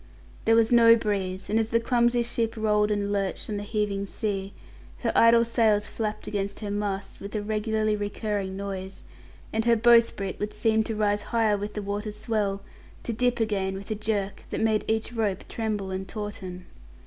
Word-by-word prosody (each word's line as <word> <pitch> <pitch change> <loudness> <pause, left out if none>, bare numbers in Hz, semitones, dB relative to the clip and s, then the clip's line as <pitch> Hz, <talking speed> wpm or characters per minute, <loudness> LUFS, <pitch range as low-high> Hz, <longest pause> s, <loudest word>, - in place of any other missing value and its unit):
There 225 - +5
was 225 0 +4
no 230 -1 +8
breeze, 195 -4 -2
and 220 +2 +2
as 220 -1 0
the 230 - +3
clumsy 240 0 +2
ship 230 -1 -1
rolled 210 -1 +2
and 205 -1 0
lurched 200 +2 -2
on 205 - -2
the - - -3
heaving 205 -1 -2
sea, 195 -2 -3 0.5
her - - +1
idle 230 0 +6
sails 220 -3 +2
flapped 215 0 -4
against 200 0 -3
her 205 -1 -3
masts 200 -1 -3
with 200 +2 -7
a 210 - 0
regularly 215 0 0
recurring 205 -2 -3
noise, 195 -1 -6 0.5
and 220 0 +1
her 235 -1 +5
bowsprit 230 -4 +3
would 210 0 -3
seem 220 -1 +2
to 225 - -3
rise 205 -1 +1
higher 220 -1 +1
with 205 +1 -5
the 210 - -3
water's 205 +1 -4
swell, 205 -3 -1 0.4
to 235 - -2
dip 245 +2 +1
again 195 -4 0
with 195 +2 -7
a - - +3
jerk 210 -2 -2
that - - -3
made 220 -1 +2
each 220 +2 -1
rope 215 -5 -1
tremble 210 -4 -3
and 190 0 -4
tauten. 190 -3 -6
210 Hz, 185 wpm, -26 LUFS, 200-225 Hz, 0.5 s, no